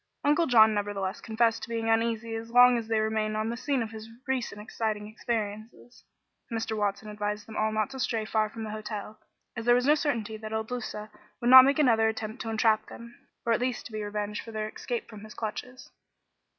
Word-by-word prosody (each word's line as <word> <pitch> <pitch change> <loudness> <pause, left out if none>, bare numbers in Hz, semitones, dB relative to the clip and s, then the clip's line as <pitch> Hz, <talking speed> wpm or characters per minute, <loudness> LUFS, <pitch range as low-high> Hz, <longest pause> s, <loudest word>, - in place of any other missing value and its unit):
Uncle 300 +3 +3
John 220 -3 +6
nevertheless 200 -2 -2
confessed 225 0 +1
to - - -7
being 230 -1 -2
uneasy 225 0 +1
as 225 0 -5
long 245 +1 +7
as 230 -2 -2
they 225 -1 +1
remained 215 0 0
on 215 +1 -1
the - - -3
scene 265 0 -1
of 225 - -7
his 220 0 -9 0.2
recent 255 -6 -2
exciting 215 -1 -3
experiences. 220 +1 -5 0.5
Mr. 225 -1 -2
Watson 205 0 -1
advised 210 0 -3
them 220 - -10
all 215 0 +1
not 215 +4 -1
to 265 - -7
stray 225 -3 -1
far 215 0 +1
from 225 +1 -7
the 215 - -5
hotel, 215 0 -6 0.4
as 230 -1 -5
there 240 0 +6
was 250 +1 +2
no 295 - +6
certainty 235 -8 -1
that 215 0 -7
Il 220 0 0
Duca 220 -2 -6 0.3
would 240 +1 +2
not 260 0 +12
make 275 0 +2
another 230 -7 +4
attempt 220 +2 -4
to 225 - -4
entrap 220 -1 +2
them, 235 0 -11 0.3
or 230 - +3
at 230 - 0
least 250 -1 -2
to - - -9
be 215 0 -4
revenged 210 0 -3
for 225 - -9
their 215 -1 -3
escape 235 +2 -5
from 215 -2 -11
his 215 - -11
clutches. 250 +3 -6
220 Hz, 215 wpm, -28 LUFS, 215-235 Hz, 0.5 s, not